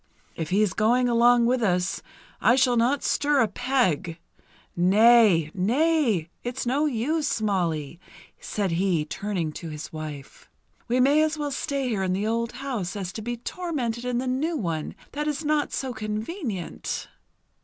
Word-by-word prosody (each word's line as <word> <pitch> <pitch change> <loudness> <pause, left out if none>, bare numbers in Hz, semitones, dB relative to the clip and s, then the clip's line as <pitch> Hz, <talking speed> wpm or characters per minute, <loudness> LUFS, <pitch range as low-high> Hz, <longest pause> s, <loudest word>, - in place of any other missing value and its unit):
If 160 -2 -4
he's 200 0 +2
going 240 +4 +2
along 240 0 +4
with 250 +1 +2
us, 180 -3 0 0.4
I 245 - +5
shall 250 -2 +3
not 245 +4 +2
stir 290 -1 +2
a 225 - +4
peg. 220 - 0 0.6
Nay! 195 -3 +5
Nay! 230 - +1
It's 245 +2 -4
no 280 +5 +1
use, 290 +3 0
Molly," 170 -7 -1 0.4
said 200 -4 -2
he 170 -2 +1
turning 175 -1 -3
to 165 +2 -7
his 150 0 -8
wife. 150 -3 -8 0.4
"We 245 +1 +1
may 280 +4 +5
as 310 0 +1
well 295 -1 -2
stay 275 -1 -2
here 215 -5 -1
in 185 -1 0
the 200 +3 -1
old 230 +1 -1
house 245 -8 -4
as 190 -2 -4
to 220 - -6
be 240 +2 -4
tormented 245 -5 -3
in 250 -1 -1
the 255 - -1
new 290 +6 -1
one 165 - -3 0.2
that 295 +1 -3
is 300 +1 -2
not 300 -1 +1
so 260 -2 -3
convenient!" 215 - -4
230 Hz, 160 wpm, -25 LUFS, 185-265 Hz, 0.6 s, I